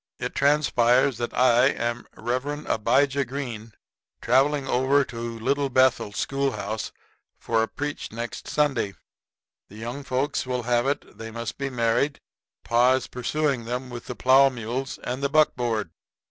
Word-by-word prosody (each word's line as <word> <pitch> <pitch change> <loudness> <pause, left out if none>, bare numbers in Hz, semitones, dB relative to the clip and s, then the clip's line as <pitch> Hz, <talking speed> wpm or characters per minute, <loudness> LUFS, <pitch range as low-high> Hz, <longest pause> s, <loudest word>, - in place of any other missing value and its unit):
It - - -4
transpires 135 -3 +3
that 120 - -2
I 125 0 +4
am 120 -3 -2
Rev. 130 +6 -3
Abijah 140 +5 +2
Green, 120 -4 -6 0.5
travelling 135 +3 +2
over 135 +3 +3
to 115 -1 -6
Little 140 +4 0
Bethel 130 -4 +3
school 135 +5 -1
house 110 0 -4 0.5
for 115 -1 0
to 110 - 0
preach 145 +4 -5
next 115 +1 -6
Sunday. 135 -9 0 0.7
The 105 - -14
young 120 +5 -6
folks 135 +1 -1
will 125 -1 -2
have 120 +1 +1
it 140 - -3
they 115 0 -6
must 115 +2 -6
be 140 0 -2
married, 125 +3 0 0.4
for - - -20
pa 120 +2 +5
is 130 -1 0
pursuing 135 0 -1
them 125 +2 -4
with 120 -1 -8
the 125 - -5
plow 135 +3 +5
mules 125 +2 -4
and 125 +2 -3
the 140 - +1
buckboard. 120 - +1
125 Hz, 155 wpm, -25 LUFS, 115-140 Hz, 0.7 s, pa